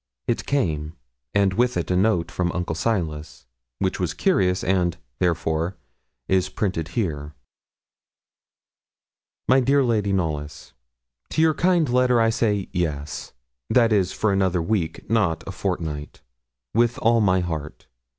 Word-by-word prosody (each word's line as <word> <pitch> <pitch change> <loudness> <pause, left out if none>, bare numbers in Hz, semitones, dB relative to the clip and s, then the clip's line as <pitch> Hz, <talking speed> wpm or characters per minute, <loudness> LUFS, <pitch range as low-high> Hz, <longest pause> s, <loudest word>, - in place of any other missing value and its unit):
It 115 - -2
came, 80 - 0 0.4
and 100 -2 +3
with 125 +4 +1
it - - -2
a - - +2
note 90 -4 +2
from 90 +2 -1
Uncle 90 -2 -2
Silas, 80 - -2 0.3
which - - -1
was - - -1
curious, 90 -1 +2
and, 90 -3 +1 0.2
therefore, 85 0 0 0.5
is 95 -1 +2
printed 90 -6 -2
here: 75 -8 -2 2.1
'MY 130 +1 +5
DEAR 135 +2 +3
LADY 110 -5 +1
KNOLLYS, 75 -6 -3 0.6
To 160 - 0
your 160 -1 +4
kind 175 0 +2
letter 125 -1 +3
I 115 0 +3
say 105 -4 0
yes 75 -5 -3 0.4
(that 115 -3 +4
is, 95 -4 +2
for 110 - 0
another 95 -2 +2
week, 85 -1 -2
not 100 -8 +1
a - - -5
fortnight), 80 -6 -4 0.5
with 120 +1 +2
all 115 0 +3
my 95 -3 +3
heart. 80 -4 -5
95 Hz, 135 wpm, -23 LUFS, 80-115 Hz, 2.1 s, MY